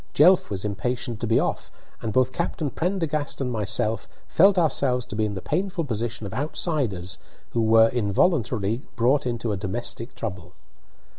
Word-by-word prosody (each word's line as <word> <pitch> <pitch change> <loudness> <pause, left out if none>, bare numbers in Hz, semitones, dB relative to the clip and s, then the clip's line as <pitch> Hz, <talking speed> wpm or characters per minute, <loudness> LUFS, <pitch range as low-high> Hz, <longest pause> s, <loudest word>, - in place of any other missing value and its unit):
Jelf 180 +5 +6
was 100 0 -3
impatient 120 +2 -2
to 115 - -2
be 115 - +4
off, - - -2 0.3
and 110 - -2
both 130 +2 +2
Captain 160 -3 -2
Prendergast 165 -5 -1
and 130 -2 -1
myself 110 0 -1 0.2
felt 195 +3 +5
ourselves 135 -7 +2
to - - -7
be 110 0 +1
in 105 -1 -3
the 95 - -6
painful 180 +1 -1
position 115 -4 -3
of 100 - -6
outsiders 130 - -1 0.3
who 115 -1 +2
are 115 0 +7
involuntarily 115 - +1
brought 130 +4 +2
into 120 -2 -2
a 100 - -1
domestic 115 +5 -4
trouble. 90 -5 -6
120 Hz, 160 wpm, -25 LUFS, 105-145 Hz, 0.3 s, are